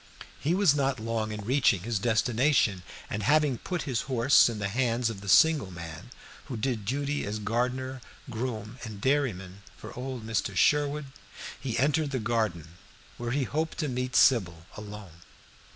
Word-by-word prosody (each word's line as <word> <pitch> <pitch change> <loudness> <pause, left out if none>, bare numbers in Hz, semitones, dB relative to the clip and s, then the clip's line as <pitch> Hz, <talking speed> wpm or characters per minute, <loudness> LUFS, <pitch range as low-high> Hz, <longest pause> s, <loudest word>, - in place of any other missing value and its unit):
He 165 +5 +1
was 190 -6 +4
not 135 -3 0
long 110 -1 -2
in 105 -1 -6
reaching 125 -6 +3
his 115 -2 -1
destination, 115 -1 +2 0.3
and 105 - -4
having 145 +1 +2
put 180 -3 -3
his 125 -5 -1
horse 125 0 +5
in 115 - -4
the 100 -1 -2
hands 120 +1 0
of 100 -3 -9
the 100 - -6
single 155 -4 +5
man 85 +3 -9 0.4
who 125 - -5
did 110 -2 -2
duty 145 +5 -1
as 105 +1 -3
gardener, 125 +5 -2 0.3
groom, 115 -1 -5
and 110 -4 -7
dairyman 100 -8 -1 0.2
for - - -10
old 125 -2 -5
Mr. 110 -1 -2
Sherwood, 150 0 +2 0.5
he 125 -4 -3
entered 150 +3 +2
the 135 - -2
garden, 105 -8 -2 0.4
where 120 0 -3
he 140 +3 0
hoped 155 +5 -2
to 155 - -1
meet 125 -1 -3
Sybil 85 -10 +3
alone. 105 -5 -10
120 Hz, 165 wpm, -28 LUFS, 105-135 Hz, 0.5 s, horse